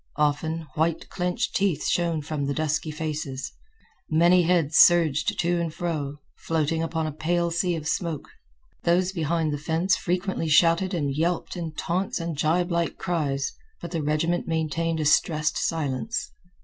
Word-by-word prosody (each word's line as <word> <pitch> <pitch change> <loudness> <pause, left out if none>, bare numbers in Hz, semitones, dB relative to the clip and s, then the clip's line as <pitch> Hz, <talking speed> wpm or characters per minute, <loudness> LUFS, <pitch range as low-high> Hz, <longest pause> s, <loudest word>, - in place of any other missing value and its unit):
Often, 155 +2 0
white 160 +2 -1
clinched 180 -1 -2
teeth 195 -6 +1
shone 170 -3 0
from 150 -1 -3
the 140 - -1
dusky 155 0 -1
faces. 150 -3 -4 0.6
Many 170 +3 +5
heads 165 -3 +2
surged 165 -4 +5
to 175 0 +1
and 165 -2 -2
fro, 155 -4 -3 0.2
floating 160 0 0
upon 165 -1 -1
a 155 - -2
pale 170 +3 0
sea 175 +1 0
of 160 -1 -5
smoke. 165 -2 -2 0.5
Those 180 +2 +2
behind 165 -3 0
the 145 - -3
fence 165 +5 +1
frequently 180 -2 -2
shouted 170 +4 +4
and 145 -4 -1
yelped 170 +5 -1
in 165 -3 -5
taunts 185 +5 -1
and 165 -1 -3
gibelike 170 +3 0
cries, 140 -6 -1 0.3
but 170 - -7
the 165 -3 -1
regiment 155 +4 0
maintained 165 0 -1
a 155 - -1
stressed 150 +1 +2
silence. 165 - -2
165 Hz, 150 wpm, -25 LUFS, 155-175 Hz, 0.6 s, Many